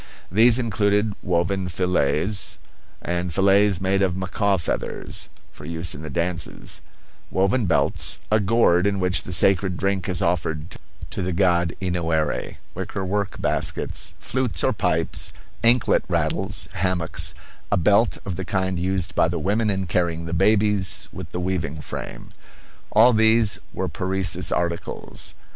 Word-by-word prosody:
These 115 +4 +5
included 105 -2 +1
woven 90 +1 0
fillets, 90 +2 +1 0.5
and 90 0 -2
fillets 100 +1 +4
made 95 +1 +1
of 95 -2 +1
macaw 95 +1 0
feathers, 80 - -4 0.2
for - - -14
use 85 +2 -1
in 70 - -8
the 80 - -6
dances; 85 +3 -2 0.5
woven 95 +4 +1
belts; - - 0
a 110 - +5
gourd 100 -3 +3
in 100 -1 0
which 90 0 +1
the - - -8
sacred 90 0 +3
drink 95 -1 -1
is 90 -2 +1
offered 80 -2 -1 0.3
to - - -3
the 90 0 -1
god 85 -2 +2
Enoerey; 85 -5 -1 0.2
wickerwork 100 +1 -3
baskets; - - -1
flutes 130 -4 -1
or - - +3
pipes; - - 0 0.3
anklet 120 +2 +4
rattles; 95 +1 -1
hammocks; 90 -3 -1 0.4
a 100 - +3
belt 100 +6 +3
of 95 -4 -4
the 95 - -3
kind 95 -2 -1
used 90 -1 -1
by - - +3
the 85 +1 -2
women 105 +7 +1
in 95 -1 0
carrying 85 -2 0
the 85 - -4
babies, 105 +1 +2
with - - -8
the 90 - -3
weaving 90 -4 -2
frame. - - -7 0.6
All 120 +3 +6
these 110 -1 +4
were - - -3
Parecis 90 -1 -1
articles. 85 -1 -3
95 Hz, 140 wpm, -23 LUFS, 85-100 Hz, 0.6 s, All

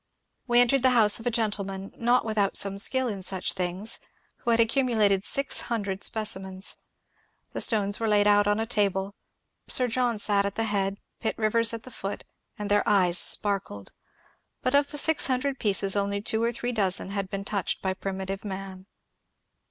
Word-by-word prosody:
We 240 0 +4
entered 245 +2 +3
the 260 - +4
house 210 -1 +4
of 225 - -6
a - - +3
gentleman 200 -4 -3
not 240 +1 +2
without 210 -3 0
some 200 0 +1
skill 260 +4 +1
in 200 -4 -4
such 185 0 -1
things, 185 +4 -2 0.4
who - - -5
had 230 0 +3
accumulated 225 -5 +2
six 275 +5 +1
hundred 200 -4 -3
specimens. 190 -3 -1 0.7
The - - -4
stones 205 -2 +1
were 225 - -1
laid 205 -1 +3
out 205 0 +4
on 205 +1 +1
a 225 - -1
table; 200 -3 0 0.5
Sir 250 - +4
John 245 -1 0
sat 205 -1 +3
at 200 0 -3
the 225 - +1
head, 200 -2 -1 0.2
Pitt 225 - -2
Rivers 225 +1 +2
at 230 -1 -5
the 255 - -11
foot, 200 -3 -6 0.3
and 205 -1 -4
their 205 0 +4
eyes 180 -4 +3
sparkled; 195 - +1 0.7
but 255 - 0
of 285 0 +3
the 295 - -3
six 320 +2 +3
hundred 265 +1 -1
pieces 195 -2 +2
only 200 0 -1
two 220 +2 -1
or 235 +1 +1
three 240 +1 -3
dozen 195 -4 0
had 200 -1 -3
been 195 0 -5
touched 200 -3 -2
by 190 -1 0
primitive 195 0 -5
man. 190 -1 -7
205 Hz, 185 wpm, -26 LUFS, 195-230 Hz, 0.7 s, We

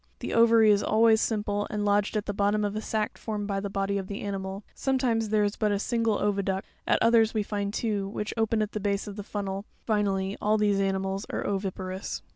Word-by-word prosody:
The - - -5
ovary 230 -2 +6
is 205 -1 +3
always 220 0 +4
simple 205 -2 -1
and 210 -1 -2
lodged 205 +1 +2
at 210 - -2
the 205 - -2
bottom 205 +1 +1
of 205 0 -2
a 215 - -2
sac 215 -1 -2
formed 210 -2 -3
by 200 -1 -1
the 200 0 -4
body 195 0 -1
of 190 - -6
the 200 +1 -5
animal; 195 0 -4
sometimes 250 -5 0
there 210 0 +3
is 205 0 0
but 215 -2 +1
a 205 - +1
single 230 0 0
.oviduct; 195 -2 0 0.2
at - - +4
others, 225 -1 +4
we 215 - +1
find 200 -1 -2
two, 205 -3 -1
which 210 +1 -4
open 225 -1 +1
at 210 - -4
the 215 - -3
base 200 0 -1
of 205 -2 -7
the 205 - -5
fun. 205 0 -4
nel; 195 +1 -4 0.2
finally, 200 -3 0
all 215 +1 +3
these 205 -2 +2
ani 195 -1 +1
mals 195 +1 -3
are - - -3
oviparous. 190 -1 -3
205 Hz, 235 wpm, -27 LUFS, 200-215 Hz, 0.2 s, ovary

